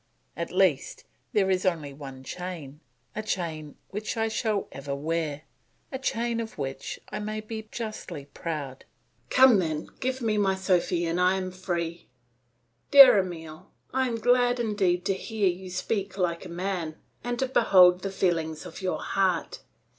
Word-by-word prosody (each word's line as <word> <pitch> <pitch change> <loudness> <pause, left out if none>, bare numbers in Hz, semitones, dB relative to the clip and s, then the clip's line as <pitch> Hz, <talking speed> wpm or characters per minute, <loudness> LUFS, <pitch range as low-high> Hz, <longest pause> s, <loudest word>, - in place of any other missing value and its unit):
At - - -4
least, - - +1 0.3
there 200 -5 +2
is 185 -1 +1
only 160 -6 -1
one 135 -2 -9
chain, 160 -3 -7 0.4
a 215 - -2
chain 160 -8 -4
which 210 +4 -4
I 225 0 +1
shall 215 -2 -1
ever 140 0 -5
wear, 155 0 -2 0.5
a 265 - -4
chain 235 -2 -1
of 225 -1 -6
which 135 -2 -5
I - - -4
may 215 +1 -3
be 220 0 -7
justly 215 -10 -6
proud. 145 -4 -6 0.4
Come 255 -5 +7
then, 160 -3 -2
give 260 +1 -1
me 220 -4 0
my 195 -2 +2
Sophy, 180 -2 +1
and 170 +2 0
I 180 +1 +4
am 185 -1 -3
free." 175 -2 -4 0.8
"Dear 275 -7 +10
Emile, 160 -4 -6 0.2
I 260 0 +2
am 235 - -2
glad 245 +2 +3
indeed 195 -6 +1
to 195 - +2
hear 210 +1 -1
you 185 +1 -5
speak 190 +2 -2
like 175 -2 -1
a - - -8
man, 175 -2 -3 0.3
and 245 +1 -2
to 265 - 0
behold 180 -7 +6
the 195 - -3
feelings 165 -4 -1
of 175 +1 -9
your 185 -1 -2
heart. 185 -4 0
185 Hz, 160 wpm, -27 LUFS, 165-215 Hz, 0.8 s, Dear